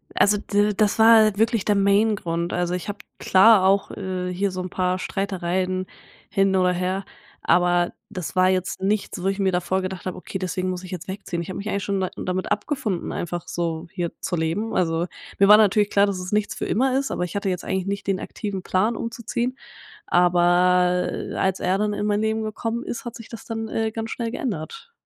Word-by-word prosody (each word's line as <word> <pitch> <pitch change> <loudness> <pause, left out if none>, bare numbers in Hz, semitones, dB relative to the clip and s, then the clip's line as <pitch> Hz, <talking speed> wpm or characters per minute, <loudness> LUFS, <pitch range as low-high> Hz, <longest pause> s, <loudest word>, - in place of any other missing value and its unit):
Also, 205 0 +4
d 205 0 +1
das 215 +2 +1
war 220 -2 +6
wirklich 225 -1 +2
der 210 - +3
Main 200 +2 +3
Grund. 170 -2 -3
Also, 175 0 0
ich 180 +3 -4
habe 205 - -5 0.2
klar 195 +1 +6
auch, 195 +1 +2
äh, 185 -2 -4
hier 195 +2 0
so 185 0 -4
'n 180 - -5
paar 185 0 0
Streitereien 185 -1 -2 0.4
hin 195 0 +2
oder 185 -1 +3
her. 185 +2 -2 0.4
Aber 175 0 +3 0.2
das 185 -6 -6
war 185 0 +4
jetzt 185 0 -1
nichts, 200 -2 -1
wo - - -4
ich 195 +1 -1
mir 190 -1 +2
davor 185 +1 0
gedacht 185 -1 -5
habe: 185 - -4
„Okay, 190 - -6
deswegen 185 0 -2
muss 180 0 -4
ich 185 - -9
jetzt 180 -3 -6
wegziehen.“ 190 -3 -4
Ich 170 - -7
habe 185 - -5
mich 205 +2 -4
eigentlich 200 -1 -1
schon 200 -2 -1
da 185 - -1
damit 185 +2 -3
abgefunden, 210 - -2
einfach 175 0 -4
so 170 -1 -3
hier 175 -3 -3
zu 180 - -2
leben. 170 +7 -1
Also, 165 -1 +1 0.3
mir 195 - +6
war 210 +1 +9
natürlich 210 -1 +4
klar, 200 0 +4
dass 200 -2 -2
es 180 0 -6
nichts 210 0 0
für - - -3
immer 260 +3 +1
ist. 275 - -3
Aber - - -1
ich 180 +1 -5
hatte 200 -1 -1
jetzt 180 -1 -3
eigentlich 190 0 -2
nicht 200 0 -3
den 195 -2 +1
aktiven 200 -4 -5
Plan 210 +6 +1
umzuziehen, 235 +3 -3 0.5
aber, 180 +1 +3
äh, - - -5
als 190 0 0
er 185 +2 +1
dann 210 0 0
in 205 - -2
mein 205 0 +1
Leben 220 0 0
gekommen 225 +2 -3
ist, 235 - -5
hat 240 -1 -7
sich 230 -2 -11
das 230 - -9
dann, 225 -1 -4
äh, 220 0 -1
ganz 225 0 -5
schnell 230 -2 -3
geändert. 240 - -5
195 Hz, 220 wpm, -23 LUFS, 180-210 Hz, 0.5 s, war